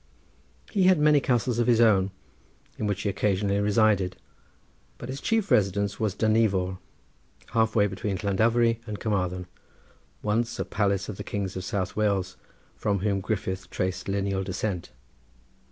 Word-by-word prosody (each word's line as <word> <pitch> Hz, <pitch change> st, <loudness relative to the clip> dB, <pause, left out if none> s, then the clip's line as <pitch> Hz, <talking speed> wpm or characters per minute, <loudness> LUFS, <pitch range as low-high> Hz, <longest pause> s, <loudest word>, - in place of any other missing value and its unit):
He 195 Hz, -4 st, +2 dB
had 185 Hz, -1 st, +6 dB
many 150 Hz, -1 st, +5 dB
castles 125 Hz, -2 st, 0 dB
of 120 Hz, -, +2 dB
his 120 Hz, -2 st, +4 dB
own, 100 Hz, -5 st, +4 dB, 0.7 s
in 105 Hz, -, -1 dB
which 100 Hz, 0 st, -2 dB
he 100 Hz, -, 0 dB
occasionally 100 Hz, 0 st, 0 dB
resided, 105 Hz, -3 st, +2 dB, 0.8 s
but 120 Hz, -, -8 dB
his 135 Hz, +1 st, -5 dB
chief 225 Hz, -3 st, 0 dB
residence 100 Hz, 0 st, +2 dB
was 105 Hz, -3 st, 0 dB
Dinevor, 100 Hz, -5 st, +1 dB, 0.7 s
half 110 Hz, -1 st, +1 dB
way 105 Hz, -2 st, +5 dB
between 95 Hz, 0 st, -3 dB
Llandovery 115 Hz, +4 st, +2 dB
and 105 Hz, -1 st, -5 dB
Carmarthen, 90 Hz, -4 st, -1 dB, 0.8 s
once 115 Hz, +3 st, 0 dB
a -, -, -2 dB
palace 100 Hz, -2 st, 0 dB
of 105 Hz, -, -6 dB
the -, -, -5 dB
kings 100 Hz, -2 st, -4 dB
of 95 Hz, -, -4 dB
South 95 Hz, 0 st, -2 dB
Wales, 100 Hz, -4 st, 0 dB, 0.4 s
from 100 Hz, -3 st, -1 dB
whom 100 Hz, -1 st, 0 dB
Griffith 95 Hz, -2 st, -3 dB
traced 95 Hz, 0 st, -3 dB
lineal 100 Hz, -1 st, -1 dB
descent. 95 Hz, -1 st, -3 dB
100 Hz, 150 wpm, -26 LUFS, 95-110 Hz, 0.8 s, had